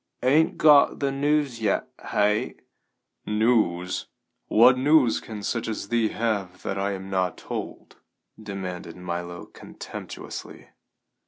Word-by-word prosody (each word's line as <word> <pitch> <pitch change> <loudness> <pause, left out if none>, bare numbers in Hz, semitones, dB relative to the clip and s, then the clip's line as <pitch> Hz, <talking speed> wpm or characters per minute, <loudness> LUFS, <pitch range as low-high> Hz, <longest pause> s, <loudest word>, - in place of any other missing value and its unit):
"Ain't 150 +6 +3
got 150 -2 +6
the 140 -1 0
news 140 -3 0
yet, 105 -3 0 0.2
hey?" 105 +1 +1 0.7
"News? 105 -5 +1 0.4
What 120 +3 +6
news 135 -2 +4
can 105 -2 -8
such 115 +1 -2
as 110 -2 -4
thee 115 -2 +2
have 100 -6 -2
that 95 - -3
I 100 +1 -1
am 95 0 -7
not 95 -1 0
told?" - - -7 0.4
demanded 95 -5 -6
Milo 85 -1 -5
contemptuously. - - -9
105 Hz, 115 wpm, -25 LUFS, 95-125 Hz, 0.7 s, got